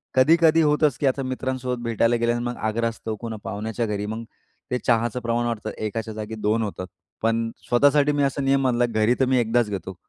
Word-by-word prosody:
कधी-कधी 160 +4 +5
होतंच 150 -2 +2
की 140 - +2
आता 135 +1 0
मित्रांसोबत 130 -1 -3
भेटायला 115 0 +2
गेल्या 120 0 +1
अन 120 - -3
मग 120 0 -3
आग्रहास्तव, 110 0 -2
कोण 115 +1 -6
पाहुण्याच्या 110 +3 -3
घरी, 105 -1 -3
मग 110 +2 -5 0.5
ते 125 - +1
चहाचं 120 +1 +2
प्रमाण 120 0 0
वाढतं. 115 -2 -3
1 110 +1 -4
जागी 110 +1 -6
2 110 +1 0
होतात. 95 -3 -5 0.4
पण 115 0 +1 0.2
स्वतःसाठी 145 +4 +4
मी 145 -1 +1
असा 140 0 0
नियम 135 0 +2
बांधला, 120 -2 +2
घरी 110 +2 +2
तर 135 - +4
मी 130 0 +2
1दाच 115 -1 +1
घेतो. 95 -1 -5
120 Hz, 195 wpm, -24 LUFS, 110-130 Hz, 0.5 s, कधी-कधी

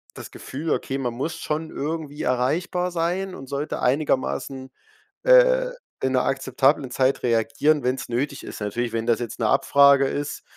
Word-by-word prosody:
das - - -9
Gefühl, 155 +5 -6
okay, 135 -2 -1
man 125 -3 -2
muss 155 +7 -3
schon 155 +1 -3
irgendwie 150 0 -4
erreichbar 170 +8 0
sein 180 +3 -1
und 135 - -9
sollte 140 +2 -3
einigermaßen, 130 -1 -1 0.5
äh, - - +5 0.3
in 130 - +1
'ner 130 - +3
akzeptablen 135 0 +1
Zeit 130 0 +1
reagieren, 145 +5 +2
wenn's 125 0 -2
nötig 140 +4 -2
ist. - - -8
Natürlich, 115 +4 -2
wenn 115 0 -2
das 115 - +2
jetzt 120 -3 -6
'ne - - +1
Abfrage 140 -1 +5
ist 145 +1 -4
140 Hz, 160 wpm, -23 LUFS, 130-155 Hz, 0.5 s, äh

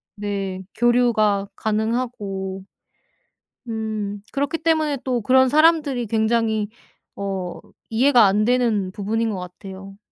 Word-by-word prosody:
네 195 -2 -4
교류가 220 -4 +2
가능하고 210 -4 -2 1.0
음 215 -2 -3
그렇기 285 +3 -1
때문에 315 -3 +1
또 250 -3 -1
그런 260 +3 +4
사람들이 300 -5 +3
굉장히 220 -1 +1 0.5
어 190 -3 -4 0.3
이해가 240 0 +5
안 205 +2 +3
되는 230 -6 +1
부분인 220 +3 -1
것 195 -3 -3
같아요. 190 +2 -10
220 Hz, 230 characters per minute, -22 LUFS, 200-245 Hz, 1.0 s, 이해가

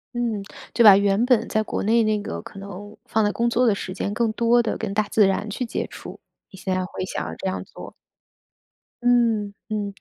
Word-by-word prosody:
嗯， 230 -4 -1 0.3
就 235 - +4
把 200 -3 +10
原 200 +2 +2
本 250 -3 +3
在 215 - 0
国 - - -3
内 225 +3 +3
那 215 -1 +1
个 - - -5
可 195 - -11
能 200 +2 -9
放 220 -1 +1
在 205 - +2
工 235 +3 0
作 245 +2 +2
的 225 - +4
时 185 -2 -5
间 200 +1 -3
更 230 +1 +1
多 235 +1 +3
的 230 - -2
跟 210 -3 -4
大 215 +1 +2
自 210 0 +3
然 195 +2 0
去 250 +5 -3
接 230 - -3
触， - - -10 0.3
你 190 - -13
现 190 - -2
在 185 - 0
会 185 - -5
想 - - -4
要 - - -5
这 190 - -5
样 185 - -3
做。 - - -11 1.1
嗯， 230 -4 +2 0.2
嗯， 205 -2 -3
215 Hz, 240 characters per minute, -23 LUFS, 200-230 Hz, 1.1 s, 把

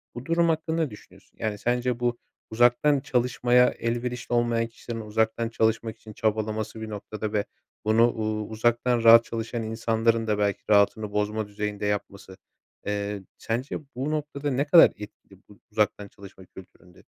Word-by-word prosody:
Bu 120 +1 -7
durum 170 0 +2
hakkında 160 +1 0
ne 150 - -2
düşünüyorsun? 105 - -16
Yani, 105 -1 -2
sence 120 +2 -1
bu 120 -1 0 0.3
uzaktan 120 +5 +3
çalışmaya 125 -1 +2
elverişli 120 +1 -3
olmayan 120 -1 +1
kişilerin 115 0 -7
uzaktan 110 +1 -1
çalışmak 110 0 0
için 110 - -12
çabalaması, 110 0 -2
bir 110 - -6
noktada, 105 0 -5
ve 105 -1 0 0.4
bunu 115 +2 +4
uuu, 110 -1 -3
uzaktan 120 +2 +1
rahat 115 0 +9
çalışan 115 0 -4
insanların 115 0 0
da 105 -1 +1
belki 100 -1 0
rahatını 105 +1 +3
bozma 105 +1 -1
düzeyinde 105 0 -4
yapması, 100 -2 -4 0.5
eee, 100 -1 -3
sence, 120 +4 -3 0.2
bu 135 +4 -2
noktada, 145 -1 -3
ne 135 +3 0
kadar 165 +3 +8
etkili 100 -2 -13
bu 105 - -17
uzaktan 105 -1 0
çalışma 95 -1 -14
kültüründe? 90 -1 -16
110 Hz, 150 wpm, -26 LUFS, 105-120 Hz, 0.5 s, rahat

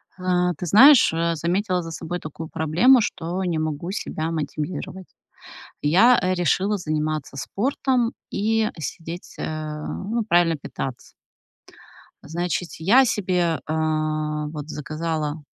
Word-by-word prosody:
А, 180 -1 +1
ты 180 - -5
знаешь, 255 - +7
а, 165 0 0
заметила 180 +3 0
за 165 - -7
собой 170 +2 -5
такую 155 0 -8
проблему, 180 - +4
что 180 -1 -3
не 175 -3 -1
могу 155 +3 -3
себя 160 -4 -3
мотивировать. 165 +4 -4 0.7
Я, 195 +12 +5
э, 185 0 +1
решила 185 +4 +1
заниматься 155 -4 -3
спортом 245 - 0 0.2
и 220 +1 +1
сидеть 165 +4 -7
э, 155 -1 -4
ну, 225 +4 -3
правильно 175 -3 +3
питаться. 135 -3 -7 1.1
Значит, 175 +2 -3
я 230 +11 +5
себе, 180 -7 0
э, 155 - -2 0.8
вот, 150 -1 -7
заказала, 155 0 -3
170 Hz, 120 wpm, -23 LUFS, 155-190 Hz, 1.1 s, знаешь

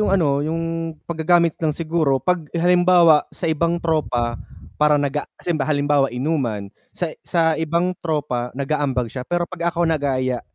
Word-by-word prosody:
yung 210 - +1
ano, 150 -7 +2
yung 165 +1 -3
paggagamit 170 0 +1
lang 155 -2 0
siguro, 160 -4 +1
pag 180 +5 0 0.2
halimbawa 175 -2 +5
sa - - -9
ibang 170 +2 0
tropa, 130 -8 -1 0.4
para 150 0 +4
naga 145 +1 -1 0.2
kase 175 - -1
halimba 140 - -1
halimbawa 145 -1 +2
inuman, 125 -7 -2 0.2
sa 175 - -3 0.2
sa 165 -2 +2
ibang 170 +3 0
tropa 145 -7 -2
nag-aambag 140 -3 -1
siya, 125 -1 -5
pero 175 0 0
pag 170 -2 -2
ako 170 0 0
nagaya 130 -5 0
155 Hz, 155 wpm, -21 LUFS, 140-170 Hz, 0.4 s, halimbawa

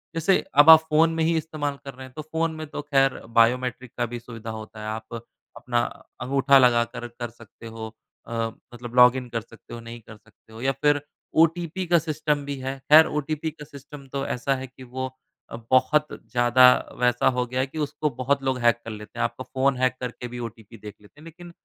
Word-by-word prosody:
जैसे 165 +4 +3 0.2
अब 150 - +5
आप 160 -1 +11
फ़ोन 160 +2 +4
में 165 - 0
ही 165 +1 +2
इस्तेमाल 150 -3 -3
कर 140 - -7
रहे 130 +1 -10
हैं 130 - -15
तो 155 - -5
फ़ोन 160 +2 -2
में 155 0 -6
तो 145 - -6
ख़ैर 135 -2 +1 0.2
बायोमेट्रिक 125 +1 +2
का 120 - 0
भी 120 +1 -6
सुविधा 115 -1 -9
होता 110 0 -9
है। 105 - -6
आप 110 +1 -6 0.4
अपना 120 -1 -1 0.4
अंगूठा 135 +2 +4
लगाकर 120 -1 +2
कर 120 0 -7
सकते 115 0 -14
हो 110 -1 -8 0.3
अ, - - -10 0.4
मतलब 120 0 -9
लॉगिन 125 +1 +5
कर 115 -1 -3
सकते 115 -1 -15
हो 120 - -6
नहीं 115 +1 -9
कर 110 0 -14
सकते 110 - -24
हो 110 - -10
या 135 +1 +1
फिर 145 -1 +3 0.4
ओटीपी 170 +2 -1
का 170 0 +4
सिस्टम 150 -2 -2
भी 140 0 -4
है। 135 +1 -4
ख़ैर 160 +1 +10
ओटीपी 150 +2 -3
का 150 0 -12
सिस्टम 140 0 -12
तो 140 0 -2
ऐसा 135 +2 -1
है 130 0 -6
कि 130 +1 -15
वो 130 +1 -5 0.4
अ, - - -7 0.2
बहुत 130 +4 +3 0.2
ज़्यादा 120 +1 +6 0.3
वैसा 125 0 +2
हो 125 -1 +1
गया 125 +1 -4
है 130 - +1
कि 145 - -11
उसको 150 0 -1
बहुत 140 +2 0
लोग 130 -1 -1
हैक 120 -1 +3
कर 115 - -5
लेते 105 +2 -10
हैं। - - +1
आपका 120 +2 -3
फ़ोन 130 +1 0
हैक 130 0 +1
करके 125 0 -5
भी 120 0 -8
ओटीपी 115 0 -15
देख 105 0 -10
लेते 105 +8 -20
हैं। - - -14
लेकिन 170 +1 -12
130 Hz, 220 wpm, -24 LUFS, 120-150 Hz, 0.4 s, आप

